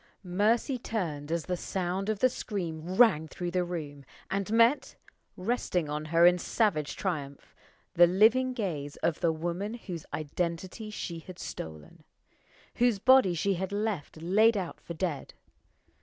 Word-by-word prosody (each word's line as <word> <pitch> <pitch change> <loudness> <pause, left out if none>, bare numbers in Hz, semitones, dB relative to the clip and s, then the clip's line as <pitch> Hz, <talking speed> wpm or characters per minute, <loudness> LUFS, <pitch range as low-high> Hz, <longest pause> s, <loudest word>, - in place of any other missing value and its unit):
Mercy 215 +8 +1
turned 160 -11 -3
as 170 -1 -1
the 180 - -1
sound 185 +2 -3
of 215 - 0
the 255 - +4
scream 180 -8 -4
rang 190 -9 +5
through 175 +2 -5
the 180 0 +1
room, 150 -5 -6 0.3
and 200 +1 -1
met 240 +5 +3 0.4
resting 185 -5 -1
on 150 +1 -3
her 165 +2 +4
in 180 0 +6
savage 175 -8 0
triumph 145 -7 -4 0.4
the 175 0 +7
living 225 +8 +4
gaze 165 - -3
of 165 - +1
the 170 -2 +2
woman 175 +7 -3
whose 180 -9 -7
identity 170 +7 -3
she 170 -5 -5
had 180 +2 -11
stolen, 80 - -8 0.7
whose 240 -3 +3
body 235 -4 +5
she 195 +4 +1
had 190 +2 -3
left 205 -7 -3
laid 215 +5 +4
out 180 -4 -5
for 170 - -7
dead. 160 -4 -3
180 Hz, 150 wpm, -29 LUFS, 165-215 Hz, 0.7 s, the